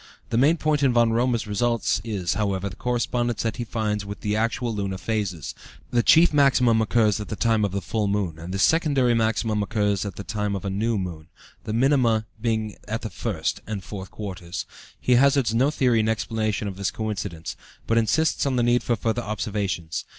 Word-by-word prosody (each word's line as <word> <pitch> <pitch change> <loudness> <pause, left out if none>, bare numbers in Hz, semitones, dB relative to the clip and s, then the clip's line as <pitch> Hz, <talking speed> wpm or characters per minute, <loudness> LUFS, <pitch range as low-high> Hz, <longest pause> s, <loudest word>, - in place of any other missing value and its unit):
The 115 - +1
main 150 +6 +4
point 155 -2 +1
in 135 -3 +3
Von 120 -1 +4
Römer's 120 0 +1
results 115 0 0
is, 100 -6 -2
however, 100 -1 -1
the 95 - -10
correspondence 120 0 -1
that 115 +1 -2
he 120 - -2
finds 105 -2 -2
with 100 0 -8
the 105 0 -1
actual 115 +1 0
lunar 100 -2 -3
phases; 95 -7 -3 0.4
the 120 - +3
chief 165 +7 +6
maximum 125 -5 +4
occurs 110 -2 +2
at 105 - -5
the - - -4
time 110 0 +2
of 100 - 0
the 100 0 -3
full 110 -2 -1
moon, 100 -6 -1
and 85 +3 -7
the 95 - -2
secondary 140 - +3
maximum 110 -1 +1
at 100 - -3
the 100 -2 -1
time 105 -2 -1
of 95 - -5
the 100 - -2
new 110 +3 0
moon, 85 -5 -5 0.4
the 110 - -3
minima 120 -3 +3 0.2
being 110 -2 -1
at 115 +2 -3
the 110 - -4
first - - -2
and 105 -3 -4
fourth 95 0 -7
quarters. 95 -4 -6 0.3
He 125 -1 +3
hazards 135 -5 +3
no 130 +5 +3
theory 125 -6 +2
in 110 0 +1
explanation 110 -2 -1
of 95 -2 -6
this 100 -1 0
coincidence, 100 -7 -4 0.3
but 115 0 +3
insists 145 +6 +1
on 135 - 0
the 120 - +2
need 120 0 +3
for 120 - 0
further 115 +2 -1
observations. 100 -6 -3
110 Hz, 200 wpm, -24 LUFS, 100-120 Hz, 0.4 s, chief